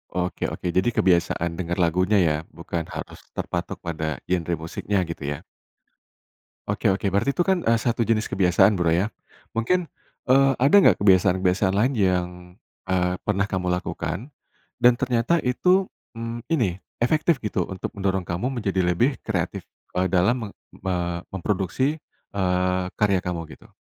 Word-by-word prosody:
Oke 90 0 -1
oke. 90 - -3
Jadi 95 +7 +1
kebiasaan 85 -1 +1
denger 85 -1 -2
lagunya, 90 +5 +2
ya? 85 -6 +4
Bukan 85 -2 -5
harus - - -7 0.2
terpatok 85 0 -4
pada 80 -3 -3
genre 85 -1 -1
musiknya 90 +4 -2
gitu, 80 -4 -6
ya? - - -12 1.2
Oke 105 +1 +1
oke. 100 +1 -1
Berarti 100 +8 +1
itu 175 - +1
kan, 190 -2 +2
eee, 115 0 +3
satu 115 0 0
jenis 110 0 +1
kebiasaan, 95 +2 +4
Bro, 85 -3 +1
ya? 90 +5 +2 0.5
Mungkin, 165 +10 +1 0.4
eee, 135 +1 +5
ada 140 +8 +5
nggak - - +5
kebiasaan-kebiasaan 95 0 +3
lain 115 +8 +2
yang, 90 -4 +2 0.6
eee, 90 0 +1
pernah 100 -1 0
kamu 90 -2 -1
lakukan, 90 - -3 0.5
dan 125 0 +5
ternyata 125 +5 +2
itu, 180 +9 +2 0.2
mmm, 115 0 -6
ini, 115 - +1 0.2
efektif 155 +4 +2
gitu 105 -5 -1
untuk 95 +4 -5
mendorong 95 -2 -1
kamu 90 +10 -2
menjadi 95 -3 0
lebih 115 +11 +2
kreatif, - - -2 0.3
eee, 90 0 +1
dalam 100 +4 +1
meng - - -24 0.3
me 90 -2 -2
memproduksi, 100 - -1 0.4
eee, 90 -1 +1 0.2
karya 100 -3 +2
kamu, 85 -2 -4
gitu? - - -19
95 Hz, 150 wpm, -24 LUFS, 90-115 Hz, 1.2 s, eee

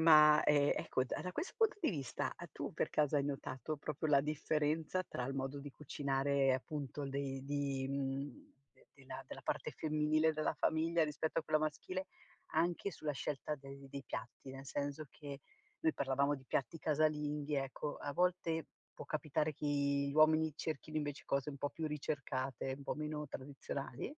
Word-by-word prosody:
ma, 155 -2 +9
ehm, 145 -1 +5
ecco, 130 - +1
da 180 +7 -3
questo 335 - -3
punto 445 -2 +4
di 330 - +3
vista, 140 - -2
uhm, - - -5
tu - - -4
per - - 0
caso 150 -1 +3
hai 140 - +3
notato 140 +1 -3
proprio 155 +2 -2
la 140 -2 +7
differenza 155 +3 +1
tra 125 - -4
il 135 +2 -2
modo 135 +1 -2
di 145 +1 -7
cucinare, 140 -1 +2
appunto 140 +1 -3
dei 135 -1 -2
di 140 -1 0
mhmm, 135 0 -3 0.2
de - - -24 0.4
della - - -8
parte - - -1
femminile 155 0 +3
della 155 0 0
famiglia 165 +2 +2
rispetto 155 +2 0
a - - -11
quella 155 - +3
maschile, 155 +5 -2 0.5
anche 170 +4 +2
sulla 155 -2 -2
scelta 150 +2 -2
dei 135 0 -10
dei 140 -1 -5
piatti; 130 +2 -6
nel 135 +1 -8
senso 145 +2 -2
che 140 -2 -8 0.4
noi 160 - +5
parlavamo 140 +1 +2
di 130 - -9
piatti 135 +5 0
casalinghi, 150 -1 +1
ecco 135 +2 -2
a 145 - -4
volte 175 -2 +2 0.3
può - - -7
capitare 155 0 0
che 150 - -4
gli 140 -1 +2
uomini 155 0 +6
cerchino 155 0 -3
invece 145 -2 -2
cose 140 +1 +1
un 140 - -8
po' 145 - 0
più 160 +1 -3
ricercate, 135 -4 -2
un 140 - -10
po' - - -1
meno 150 0 -3
tradizionali? 135 - -5
145 Hz, 170 wpm, -37 LUFS, 140-155 Hz, 0.5 s, ma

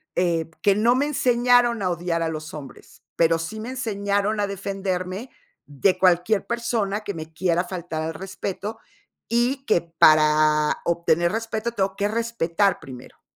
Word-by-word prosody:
eh, 170 -2 0
que 200 - +5
no 230 +4 +3
me 275 +3 +1
enseñaron 245 -4 +3
a 185 - +1
odiar 170 0 -1
a 165 - -1
los 155 0 -6
hombres, 145 -3 -12
pero 165 0 +3
sí 185 +7 -6
me 225 +3 -6
enseñaron 205 -4 -1
a 205 - +1
defenderme 195 +2 -4 0.4
de 180 +6 +1
cualquier 185 +3 +2
persona 235 -4 -1
que 200 - -4
me 160 -1 -8
quiera 175 +1 0
faltar 175 -3 -5
al 160 0 -4
respeto, 195 +3 -5 0.5
y 245 +4 +1
que 195 -8 +3
para 155 -2 +4
obtener 170 0 +1
respeto 225 +1 -3
tengo 195 -3 -1
que 200 +1 0
respetar 205 -4 0
primero. 130 -4 -12
190 Hz, 155 wpm, -23 LUFS, 165-220 Hz, 0.5 s, que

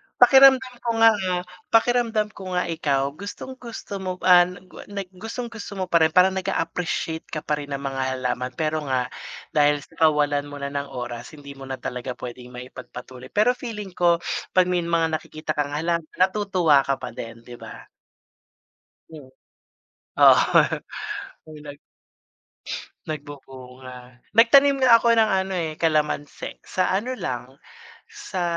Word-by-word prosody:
pakiramdam 265 0 +6
ko 235 - -4
nga, 225 - +9 0.2
ah, 180 -1 -1 0.2
pakiramdam 225 -2 +2
ko 190 -3 -10
nga 180 - +2
ikaw 140 -4 -1
gustong-gusto 205 - -8
mo 185 -1 -4
an 180 0 +6 0.2
gwa - - -12
nag 200 -2 -6
gustong-gusto 225 -1 -6
mo 190 - -2
pa 170 - +5
rin, 160 0 +2
parang 185 +1 +6
nag-a-appreciate 165 -3 -3
ka 155 - -5
pa 150 -1 -1
rin 145 -1 -5
ng 140 - -6
mga 135 -1 -3
halaman. 125 0 -3
Pero 155 -1 -1
nga, 125 -1 -1 0.4
dahil 145 -1 +2
sa - - -19
kawalan 145 -1 +1
mo 145 - -9
na 140 - -3
ng 140 0 -3
oras 120 +3 -6
hindi 140 -1 -11
mo 135 - -9
na 130 - -3
talaga 125 0 -5
pwedeng 125 0 -9
maipagpatuloy, 125 0 -10
pero 210 - +3
feeling 220 -6 -7
ko, 175 -1 +3 0.4
'pag 185 - +6
may 180 - +2
mga 165 -2 0
nakikita 155 0 -6
kang 145 -1 -2
halaman, 165 +1 -1
natutuwa 185 -6 +3
ka 135 - +2
pa - - -7
din, 115 0 -9
di 120 0 -11
ba? - - -10 1.3
Hmm. 150 -4 -12 0.9
Oo, - - +4 0.7
nag 145 -1 -10 1.3
nagbubunga. 130 -4 -10
Nagtanim 275 +5 +6
nga 255 -3 +7
ako 235 0 +4
ng 225 -1 +4 0.2
ano, 190 - -5
eh, 160 -2 -3
kalamansi. 150 -2 -1
Sa 185 - -1
ano 210 +7 -1
lang, 130 -3 -5 0.5
sa 415 - -5
160 Hz, 145 wpm, -23 LUFS, 140-200 Hz, 1.3 s, nga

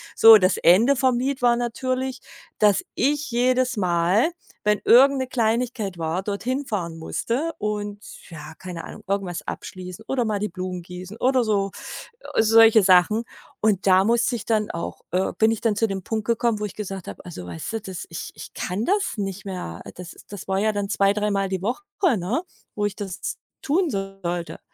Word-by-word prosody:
So, 225 -1 +10
das 185 -1 +2
Ende 225 +11 +5
vom 255 -1 +2
Lied 265 +1 -2
war 240 -1 +4
natürlich, 255 +2 -2 0.4
dass 210 -2 +4
ich 290 0 0
jedes 255 +2 +2
Mal, 180 - +2 0.3
wenn 210 -1 +2
irgend 275 +3 +7
'ne 260 - -2
Kleinigkeit 230 -4 -1
war, 165 +3 -2
dorthin 250 +8 -2
fahren 170 -8 -3
musste 240 - -2
und, 205 -1 -3 0.3
ja, 160 -2 -9
keine 180 -3 -7
Ahnung, - - -10
irgendwas 195 -3 -2
abschließen 185 +3 -7
oder 265 -2 0
mal 210 -2 -1
die 210 +1 -2
Blumen 180 0 -5
gießen 180 +4 -9
oder 255 0 +2
so, 200 -3 0 0.7
äh - - +7
solche 225 -1 +6
Sachen. 185 +4 +5 0.4
Und 200 -3 +1
da 185 0 +6
musste 235 +3 +2
ich - - -9
dann 215 -2 0
auch, 170 - -5
äh 185 +2 0
bin 220 0 +4
ich 225 - -3
dann 225 -3 +1
zu 225 +2 +2
dem 195 -2 -4
Punkt 220 +1 -3
gekommen, 235 -2 +1
wo 210 - 0
ich 200 - -7
gesagt 195 -3 -6
habe: - - -8
„Also, 170 - -8
weißt 85 - -6
du, 225 - -2
das 190 -3 -7
ich 165 - -6
ich - - -10
kann 190 +4 -3
das 400 +1 +1
nicht 195 -1 -4
mehr.“ 180 - -6
Das 180 -1 -9
das 205 -3 -8
war 190 0 +1
ja 215 +1 +2
dann 205 -1 -2
zwei 195 0 +3
dreimal 205 -2 0
die 190 -2 -2
Woche, 240 - -2 0.3
ne, 210 - -1 0.3
wo 210 - 0
ich 205 -1 -2
das 195 -3 -5 0.2
tun 330 +4 +1
sollte. 195 - -4
210 Hz, 190 wpm, -23 LUFS, 185-235 Hz, 0.7 s, So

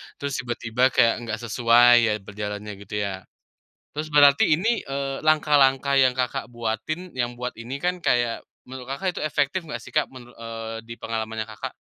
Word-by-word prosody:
terus 140 -1 -4
tiba-tiba 120 +1 0
kayak 115 - +5
nggak 110 - -1
sesuai 120 +1 +5
ya - - +2
berjalannya, 105 +1 -6
gitu 100 +1 -8
ya? 95 -2 -5 0.7
Terus 155 +1 -2
berarti 140 -1 +6
ini, 185 +9 +1 0.2
eee, 135 0 -3
langkah-langkah 140 -3 +3
yang, 130 -2 +4
Kakak, 125 -2 -2
buatin, 120 - -3
yang 120 0 -1
buat 125 0 -6
ini 120 +3 -7
kan 180 +1 0
kayak, 120 -1 +1 0.2
menurut, 130 -1 -8
Kakak, 180 +4 -3
itu - - -3
efektif 155 +4 -1
enggak 150 - -6
sih, - - -12
Kak? 150 - +1
Menur 120 -1 -13
eee, 115 0 -7
di 115 - -8
pengalamannya, 110 -1 -4
Kakak? 110 - -7
120 Hz, 170 wpm, -24 LUFS, 115-140 Hz, 0.7 s, berarti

